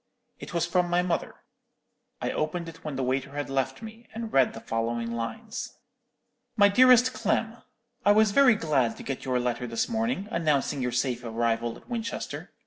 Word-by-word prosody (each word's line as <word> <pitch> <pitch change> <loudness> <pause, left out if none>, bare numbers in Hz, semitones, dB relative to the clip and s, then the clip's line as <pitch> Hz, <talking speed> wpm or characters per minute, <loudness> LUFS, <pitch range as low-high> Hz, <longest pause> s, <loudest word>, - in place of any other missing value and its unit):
"It - - -8
was 170 -1 +1
from 175 0 +1
my 175 +1 +2
mother. 175 -2 -2 0.9
I - - 0
opened 165 +2 -2
it 165 0 -11
when 150 -3 -4
the 130 - -1
waiter 135 +2 -1
had 145 -1 -3
left 135 - -1
me, 225 +1 -10
and 225 -1 -5
read 135 -2 +4
the - - -7
following 115 +1 -2
lines: 115 -1 -5 0.8
"'MY 205 -1 +7
DEAREST 250 +3 +6
CLEM,—_I 235 0 -2
was 215 -1 +5
very 255 0 +6
glad 140 - +1
to - - -9
get 135 - -5
your 130 -1 +1
letter 125 0 -2
this 115 -1 -1
morning, 225 -3 -1
announcing 150 -4 0
your 125 0 -1
safe 125 0 -1
arrival 115 0 -1
at - - -19
Winchester. 230 -2 -5
155 Hz, 175 wpm, -27 LUFS, -, 0.9 s, MY